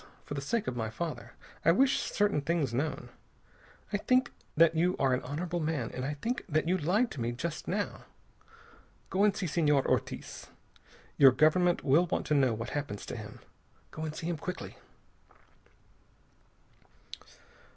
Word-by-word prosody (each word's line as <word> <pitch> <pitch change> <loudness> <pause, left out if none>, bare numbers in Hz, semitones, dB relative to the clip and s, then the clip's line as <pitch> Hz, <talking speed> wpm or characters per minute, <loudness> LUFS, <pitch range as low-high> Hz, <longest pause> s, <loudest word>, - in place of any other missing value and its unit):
For - - -6
the 140 - -3
sake 220 +10 -1
of 130 - -3
my 110 -2 -2
father, 160 +8 -5 0.3
I 165 - +6
wish 265 +9 +3
certain 205 -7 +1
things 145 -4 0
known. 145 +5 -2 0.8
I - - +3
think 255 +4 +2 0.3
that 165 0 +6
you 175 +3 +2
are 135 -2 +2
an 125 - 0
honorable 170 +6 -3
man, 155 -7 -2
and 125 - -4
I 145 +3 -2
think 230 - -3
that 155 +1 +1
you 180 - +3
lied 185 +9 +1
to 130 - -6
me 120 +1 -1
just 160 +6 -5
now. 205 +2 -3 1.1
Go 195 +2 +2
and 210 0 +3
see 190 - -2
Senor 150 -4 +2
Ortiz. - - -2 0.7
Your 135 -2 +9
government 165 +6 +3
will 160 +5 +4
want - - -1
to - - 0
know 135 -4 +4
what 115 +2 -5
happens 145 -9 -4
to - - -6
him. - - -9 0.5
Go 155 - -8
and 155 -1 -4
see 165 - -6
him 170 -2 -1
quickly." 180 +4 -6
155 Hz, 165 wpm, -30 LUFS, 140-180 Hz, 1.1 s, Your